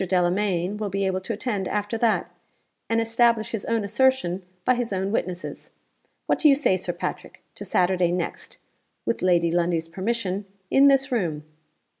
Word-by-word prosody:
Delamayn 185 +1 +1
will 210 -1 -3
be 195 +1 -1
able 190 0 -1
to 225 - -3
attend 205 -4 -2
after 210 +2 -2
that, 225 -2 +1 0.6
and 230 0 +2
establish 230 0 +2
his 220 -4 -4
own 230 -2 0
assertion 220 -4 +1 0.2
by 255 - +5
his 245 -2 -2
own 190 0 -1
witnesses. 185 -4 -4 0.6
What - - +1
do 305 - +6
you 275 - +6
say, 275 -9 +2
Sir 185 - -3
Patrick, - - -6
to - - -9
Saturday 180 -1 +2
next 175 -1 -4 0.5
(with - - -1
Lady 175 -2 +3
Lundie's 170 -1 0
permission) 195 +2 -2 0.3
in 275 +1 +6
this 275 0 +3
room? 170 -11 -1
200 Hz, 165 wpm, -24 LUFS, 180-230 Hz, 0.6 s, do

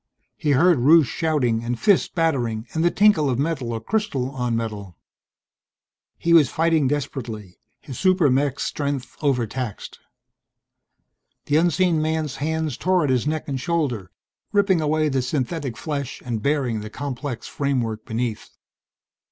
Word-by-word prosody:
He 150 -7 0
heard 165 +2 +4
Rusche 155 +5 +6
shouting 130 -8 0
and 120 0 -3
fists 200 -3 +3
battering 125 -10 -1
and 160 - 0
the 175 - +4
tinkle 195 -8 +4
of 125 - 0
metal 140 -4 -1
or 115 - -2
crystal 135 - -2
on 125 -3 -2
metal. 105 -6 -5 1.2
He 170 - +1
was 155 -6 +6
fighting 160 -3 +2
desperately, 120 -8 -4 0.2
his 130 - -8
super 185 -7 +3
mech's 140 +1 0
strength 140 -3 -3
overtaxed. 125 -5 -2 1.5
The 145 - +2
unseen 175 0 +2
man's 155 -2 -1
hands 155 -2 -2
tore 185 -2 +2
at 140 - +1
his 130 +2 +1
neck 155 0 -2
and 135 -3 -3
shoulder, 140 - -1 0.4
ripping 200 -4 +3
away 155 0 +1
the 135 -3 0
synthetic 130 0 -3
flesh 140 -3 -4
and 115 -3 -3
baring 135 -4 0
the 105 0 -7
complex 135 -1 -5
framework 120 -6 -2
beneath. 115 -1 -3
140 Hz, 145 wpm, -23 LUFS, 120-160 Hz, 1.5 s, Rusche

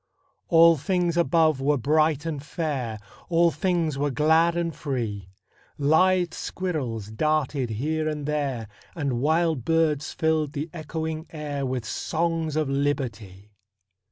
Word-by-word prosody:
All 165 -1 +6
things 175 +2 0
above 165 -4 +3
were 145 +2 +2
bright 155 +3 +2
and 155 -4 -3
fair, 140 -7 -3 0.3
All 170 0 +4
things 170 -7 0
were 145 +1 +1
glad 160 +5 +3
and 170 -1 -1
free; 115 - -4 0.5
Lithe 175 +4 +3
squirrels 130 - -4
darted 145 0 0
here 155 +8 -1
and 150 -2 -4
there, 140 -7 -2 0.3
And 140 -7 -1
wild 160 -2 +1
birds 155 -1 +1
filled 160 -2 0
the 150 +1 -4
echoing 160 0 -4
air 145 -3 -4
With 125 -3 -3
songs 165 +5 -1
of 155 -2 +1
Liberty! 115 -8 -3
155 Hz, 125 wpm, -25 LUFS, 135-165 Hz, 0.5 s, All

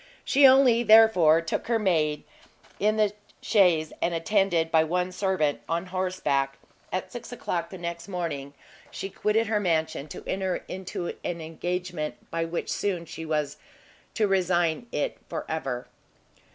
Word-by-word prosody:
She 275 0 +6
only, 260 -3 +6
therefore, 215 -9 +6
took 165 - -3
her 230 -1 +2
maid 160 -8 +1 0.6
in 215 +1 +2
the 210 -1 +2 0.3
chaise, 175 -7 +3
and, 170 - +1
attended 170 -2 +1
by 160 -1 +5
one 180 +3 -1
servant 185 -6 0
on 170 +2 -1
horseback, 180 -7 -1 0.3
at - - -3
six - - -8
o'clock 170 -1 -3
the 190 - -8
next 170 -1 -5
morning, 150 -7 -4 0.3
she 195 - -6
quitted 215 +4 +1
her 215 -1 +1
mansion, 160 -5 -1
to - - -9
enter 190 -1 -2
into 185 -2 -5
an 170 -1 -3
engagement 165 -2 -4 0.2
by 165 0 -1
which 165 +1 -4
soon 180 -4 -1
she 160 0 -8
was 150 -2 -1 0.6
to 220 - +2
resign 180 0 +1
it 150 - -2
for - - -4
ever. 135 -6 -3
175 Hz, 150 wpm, -26 LUFS, 160-195 Hz, 0.6 s, She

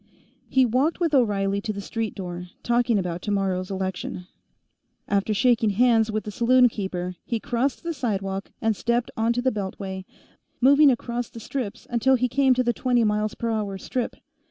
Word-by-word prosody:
He 265 -1 +4
walked 260 +9 +1
with 335 -4 0
O'Reilly 200 -6 +2
to 215 - -3
the 200 - -6
street 220 +2 -4
door, 180 -2 -6 0.2
talking 240 -1 +2
about 180 -2 -2
tomorrow's 190 -3 -1
election; 190 -1 -4 0.8
after 200 +1 +1
shaking 235 0 +3
hands 225 +1 +3
with 215 0 -2
the 210 - -6
saloon 250 +3 +4
keeper, 180 -4 -4
he 230 - -2
crossed 250 +7 -1
the 335 0 -2
sidewalk 195 -7 -3
and 220 -1 +2
stepped 235 +3 0
onto 235 +2 0
the 260 - +3
beltway, 190 -2 -5 0.5
moving 280 +3 +6
across 240 -1 -2
the 230 - -10
strips 225 -2 -5
until 240 +3 +3
he 250 0 +1
came 265 +1 +3
to 255 - +2
the 240 -1 +1
twenty 245 0 +1
m.p.h. 210 -1 -1
strip. 250 -2 -2
225 Hz, 165 wpm, -24 LUFS, 195-245 Hz, 0.8 s, moving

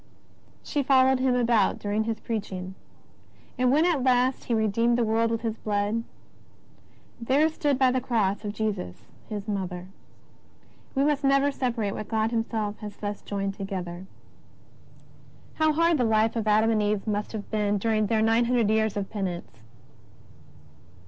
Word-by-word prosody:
She 290 - -1
followed 265 -1 +4
Him 255 -1 +2
about 235 -4 +2
dur 205 - -5
ing 215 +1 0
His 225 -1 -2
preaching. 190 -4 -5 0.8
And 250 0 +2
when 305 +4 +4
at 335 -6 +2
last 255 0 +2
He 240 - -1
redeemed 230 +2 +2
the 240 - +2
world 225 +1 +1
with 230 0 -2
His 225 -1 -3
Blood, 205 0 -1
^' 230 - -2 1.2
there 270 +6 +3
stood 290 -3 0
by 260 -1 +4
the 255 0 0
Cross 210 -4 0
of 205 - -3
Jesus 205 - -4 0.3
His 210 -1 -5
Mother." 185 -3 -4 1.1
We 270 - +2
must 290 -1 +1
never 275 +1 +3
separate 235 -7 -2
what 215 - -6
God 220 0 0
Himself 225 -2 -2
has 210 -1 -8
thus 205 -1 -5
joined 195 -1 -3
together. 190 -2 -6 1.5
How 315 0 +3
hard 335 0 +2
the - - +3
life 220 0 +2
of 220 -2 -2
Adam 215 +2 +4
and 215 -1 +2
Eve 210 -1 0
must 210 -1 -2
have 210 -2 -6
been 210 -1 +1
during 215 0 +1
their 220 0 +2
nine 225 +2 +3
hundred 235 -3 +2
years 220 -1 +1
of 200 -1 -2
penance! 180 - -5
220 Hz, 165 wpm, -26 LUFS, 205-250 Hz, 1.5 s, followed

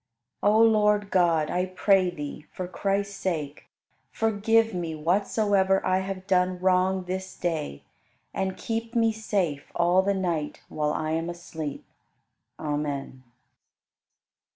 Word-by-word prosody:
36. 205 - +4
O - - +5
Lord 210 -2 +4
God, 165 -4 +3
I 180 - +1
pray 185 0 +3
Thee, 150 -3 -7
for 185 - -5
Christ's 200 +2 -1
sake, 150 -7 -3 0.4
forgive 225 +1 +2
me 170 -3 -3
whatsoever 195 +3 +2
I 185 0 +2
have 190 0 -5
done 185 -1 +2
wrong 185 +1 +2
this 185 +1 -5
day 155 - -3 0.5
and 190 -1 -2
keep 230 +1 -4
me 225 -1 +4
safe 200 -10 -2
all 175 +2 +4
the 200 +1 0
night 170 -6 -2
while 150 -1 -1
I 155 +1 -2
am 165 +1 -1
asleep. 160 -4 -6 0.7
Amen. 145 -3 -3
185 Hz, 130 wpm, -26 LUFS, 160-200 Hz, 0.7 s, O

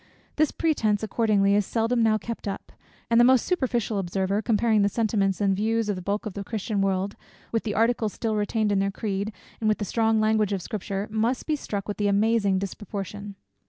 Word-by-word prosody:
This 310 0 +3
pretence 220 -11 0
accordingly, 210 -2 +2
is 205 0 +3
seldom 230 +3 0
now 220 -1 +4
kept 230 +1 -6
up; 195 - -5 0.4
and 230 - +5
the - - +7
most 255 0 +5
superficial 240 - 0
observer, 190 +2 -1
comparing 220 0 +2
the 200 - +3
sentiments 200 -3 0
and 195 -2 +2
views 220 +2 0
of 205 - 0
the 185 - -6
bulk 200 +4 -2
of 215 - -4
the 200 - -5
Christian 210 -1 -2
world, 195 +1 0 0.4
with 225 - +1
the 210 -2 -3
articles 225 -2 +1
still 220 -2 -2
retained 210 0 0
in 200 - +2
their 195 0 +1
creed, 200 0 -3 0.3
and 215 - +1
with 215 - +2
the 205 - -3
strong 225 +2 +2
language 215 -1 +2
of 195 - -2
Scripture, 200 0 -4
must 225 +4 0
be 310 - +1
struck 205 -8 -5
with 205 - -4
the 205 - +1
amazing 200 -1 +2
disproportion. 200 +1 -6
210 Hz, 205 wpm, -25 LUFS, 200-225 Hz, 0.4 s, the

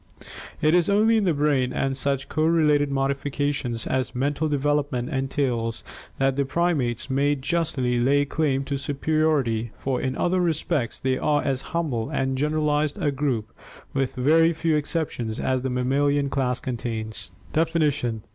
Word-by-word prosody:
It 155 +1 +4
is 175 0 +3
only 220 +3 +4
in 210 - +1
the 175 - +3
brain 140 -3 +1
and 135 0 -1
such 140 0 -1
correlated 155 -2 +2
modifications 140 -3 -1
as 130 -1 -1
mental 145 +4 0
development 145 -3 0
entails 130 -4 -1 0.3
that 135 0 +2
the 140 - +1
primates 135 -7 0
may 140 +2 +2
justly 135 -4 0
lay 140 +4 +3
claim 140 -2 0
to 140 0 -3
superiority, 145 -5 0
for 130 -2 -2
in 130 0 -2
other 185 +1 +1
respects 160 -6 -1
they 130 0 0
are 150 -1 +1
as 135 -2 -1 0.2
humble 125 -10 -1
and 135 0 -1
generalized 150 +1 0
a 145 - +1
group, 130 -6 -2 0.4
with 135 -2 -1
very 160 +6 +4
few 160 0 0
exceptions, 145 -7 -2
as 130 -1 0
the 130 - -2
mammalian 140 +3 +1
class 125 -2 0
contains. 115 -3 -4 0.2
Definition. 150 -8 0
140 Hz, 145 wpm, -24 LUFS, 130-150 Hz, 0.4 s, It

